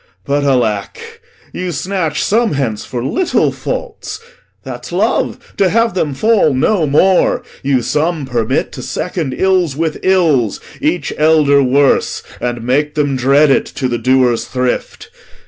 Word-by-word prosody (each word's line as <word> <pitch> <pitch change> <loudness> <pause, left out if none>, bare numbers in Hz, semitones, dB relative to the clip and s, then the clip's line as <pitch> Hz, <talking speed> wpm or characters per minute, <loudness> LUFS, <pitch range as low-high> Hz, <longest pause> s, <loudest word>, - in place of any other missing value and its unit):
But 145 +1 0
alack, 120 - 0 0.5
You 180 -1 -3
snatch 170 -1 -2
some 225 +1 +1
hence 125 -7 -2
for 120 -2 -5
little 365 - +1
faults; 435 -2 -5 0.4
that's - - -8
love, - - -1
To 195 -2 +3
have 230 +1 +1
them 155 -6 -1
fall 210 - +2
no 165 +4 +1
more. 180 +6 +3 0.2
You 135 -3 +1
some 155 +1 -1
permit 120 -4 -1
To - - -8
second 155 -7 -3
ills 185 -6 +1
with 160 0 -2
ills, 160 - +2 0.2
each - - -1
elder 150 -2 +4
worse, 135 +1 +2 0.2
And 120 -1 -3
make 145 +5 0
them 145 -2 0
dread 140 +3 +4
it, - - +2
to 130 - -1
the 120 -1 -2
doer's 130 -2 +2
thrift. 125 -1 -3
145 Hz, 145 wpm, -15 LUFS, 130-180 Hz, 0.5 s, elder